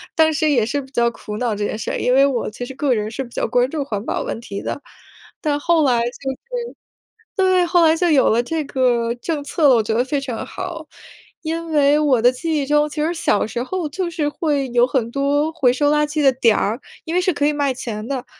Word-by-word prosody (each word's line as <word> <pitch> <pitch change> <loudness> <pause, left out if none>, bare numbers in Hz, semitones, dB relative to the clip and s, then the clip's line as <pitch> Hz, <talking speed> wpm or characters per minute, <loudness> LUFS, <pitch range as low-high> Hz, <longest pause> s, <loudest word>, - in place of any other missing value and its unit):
当 315 -1 +4
时 310 0 +1
也 245 -7 +3
是 285 +5 -2
比 265 - -14
较 235 -3 +2
苦 210 -2 -8
恼 235 -1 -1
这 205 0 -2
件 215 - -3
事 220 - -4
儿。 - - -2
因 250 - +1
为 270 +1 +6
我 265 -4 -1
其 230 +3 -7
实 265 - -8
个 270 -1 +1
人 215 -1 -2
是 270 +4 -4
比 245 - -12
较 - - -2
关 245 +2 +2
注 300 -1 -2
环 210 -6 -4
保 - - -2
问 - - -4
题 200 -4 -6
的， - - -4 0.6
但 295 -2 0
后 330 +1 +2
来 250 -4 +3
就 240 - -1
是 265 +1 -6 1.0
对， 370 -2 +3
后 345 -1 +4
来 320 0 +5
就 350 +1 +1
有 280 -3 +4
了 230 +2 +3
这 315 +5 -2
个 240 -4 +1
政 290 +4 -3
策 300 +1 +1
了， 260 - +6
我 225 - +2
觉 220 - -2
得 235 +2 +2
非 280 +2 -1
常 250 -5 -5
好。 340 -4 -7 0.6
因 330 +1 -3
为 295 -1 +4
我 285 -5 +3
的 245 +2 +5
记 315 +5 -2
忆 280 - -1
中， 295 +1 +2
其 300 0 -4
实 330 +3 0
小 320 -10 +1
时 235 - -4
候 355 +4 -3
就 355 +4 -3
是 320 -3 -2
会 290 -3 -1
有 240 0 +3
很 245 -3 -1
多 285 +3 +1
回 275 -6 +2
收 290 +2 +2
垃 300 0 +3
圾 300 +1 -2
的 270 - +6
点 235 -4 +3
儿， 220 +4 -1 0.3
因 325 - -4
为 360 - +3
是 365 0 +2
可 285 -1 0
以 300 - +1
卖 285 -2 0
钱 220 -3 -6
的。 265 -2 -3
280 Hz, 275 characters per minute, -20 LUFS, 245-310 Hz, 1.0 s, 为